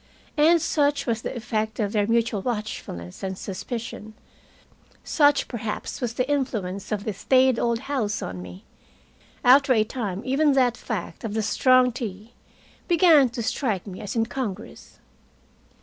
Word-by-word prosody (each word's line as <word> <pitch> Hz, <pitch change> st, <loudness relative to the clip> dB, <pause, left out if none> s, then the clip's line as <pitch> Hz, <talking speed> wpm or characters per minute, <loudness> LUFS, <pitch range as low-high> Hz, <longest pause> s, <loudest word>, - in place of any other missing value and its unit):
And 320 Hz, +3 st, +5 dB
such 290 Hz, -3 st, +1 dB
was 230 Hz, -2 st, -1 dB
the -, -, -5 dB
effect 220 Hz, -2 st, -3 dB
of 205 Hz, -2 st, 0 dB
their 205 Hz, -2 st, +1 dB
mutual 230 Hz, -2 st, +1 dB
watchfulness 210 Hz, -, -5 dB
and 190 Hz, -1 st, -4 dB
suspicion, 215 Hz, +2 st, -6 dB, 0.9 s
such 290 Hz, -2 st, +3 dB
perhaps 225 Hz, 0 st, -5 dB
was 235 Hz, -2 st, -2 dB
the 255 Hz, +1 st, 0 dB
influence 215 Hz, -9 st, -2 dB
of 205 Hz, -1 st, -1 dB
the 215 Hz, -, -3 dB
staid 255 Hz, +4 st, +3 dB
old 235 Hz, 0 st, 0 dB
house 255 Hz, -7 st, -2 dB
on 90 Hz, 0 st, -6 dB
me, 90 Hz, +1 st, -10 dB, 0.8 s
after 270 Hz, +1 st, +6 dB
a 215 Hz, -, +4 dB
time 215 Hz, -4 st, -4 dB
even 280 Hz, +3 st, +3 dB
that 250 Hz, -3 st, +3 dB
fact, 210 Hz, -9 st, -5 dB
of 220 Hz, -2 st, -4 dB
the 220 Hz, -, 0 dB
strong 255 Hz, +3 st, +4 dB
tea, 225 Hz, -2 st, -7 dB, 0.5 s
began 330 Hz, -6 st, +5 dB
to 235 Hz, 0 st, -5 dB
strike 220 Hz, -, -1 dB
me 190 Hz, -3 st, -8 dB
as 210 Hz, +2 st, -5 dB
incongruous. 225 Hz, -2 st, -4 dB
230 Hz, 150 wpm, -24 LUFS, 210-260 Hz, 0.9 s, after